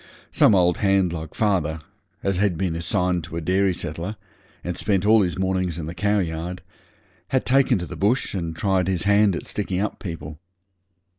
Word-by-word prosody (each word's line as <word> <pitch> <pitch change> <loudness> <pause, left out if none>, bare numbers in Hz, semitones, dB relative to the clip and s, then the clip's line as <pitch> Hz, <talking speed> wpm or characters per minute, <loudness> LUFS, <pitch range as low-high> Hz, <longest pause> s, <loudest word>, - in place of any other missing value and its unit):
Some 105 - +5
old 90 -2 +3
hand 95 -3 +2
like 80 -2 -7
father, 90 -7 0 0.4
as 95 -2 0
had 95 -3 +1
been 90 -2 -1
assigned 90 +1 0
to 80 - -7
a - - 0
dairy 95 +4 +2
settler, 85 +3 -5 0.5
and 90 -1 -3
spent 100 0 0
all 110 +1 +6
his 90 -3 -1
mornings 95 -3 0
in 80 - -4
the 80 - -5
cowyard, 90 -2 -1 0.6
had 130 - 0
taken 135 -2 +3
to 90 - -4
the - - -8
bush 110 +6 +1
and 85 -4 -3
tried 95 0 +1
his 90 -3 0
hand 100 -1 +4
at - - -5
sticking 95 -3 -3
up 105 - -2
people. 80 -4 -7
90 Hz, 180 wpm, -23 LUFS, 85-100 Hz, 0.6 s, all